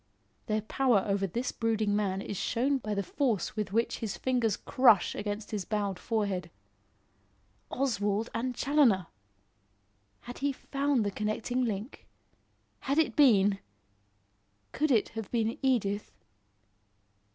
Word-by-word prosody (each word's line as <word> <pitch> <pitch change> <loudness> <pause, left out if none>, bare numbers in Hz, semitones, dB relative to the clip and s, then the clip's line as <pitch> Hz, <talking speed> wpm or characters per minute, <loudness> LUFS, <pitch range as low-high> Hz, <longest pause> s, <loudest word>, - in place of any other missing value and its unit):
Their 215 -1 0
power 235 -2 +2
over 195 -1 0
this 240 +8 -2
brooding 220 -3 0
man 195 -2 -1
is 205 - -5
shown 250 +8 0
by 215 -3 -3
the 200 - -1
force 225 - -1
with 210 -3 -3
which 230 +3 0
his 215 -3 -4
fingers 245 -5 0
crush 245 -7 +4
against 205 +1 -4
his 210 -3 -2
bowed 200 -2 -2
forehead. 200 -6 -2 1.2
Oswald 220 -5 0
and 245 +2 -2
Challoner! 250 - +3 1.2
Had 245 0 -9
he 280 +1 +1
found 275 -3 0
the 205 - -1
connecting 215 +5 -1
link? 215 +3 -5 0.7
Had 275 +2 -1
it 320 - +2
been 205 -8 +5 1.1
could 305 +2 0
it 230 -6 +3
have 225 -2 -6
been 230 -1 -1
Edith? 210 -7 0
220 Hz, 130 wpm, -30 LUFS, 205-255 Hz, 1.2 s, been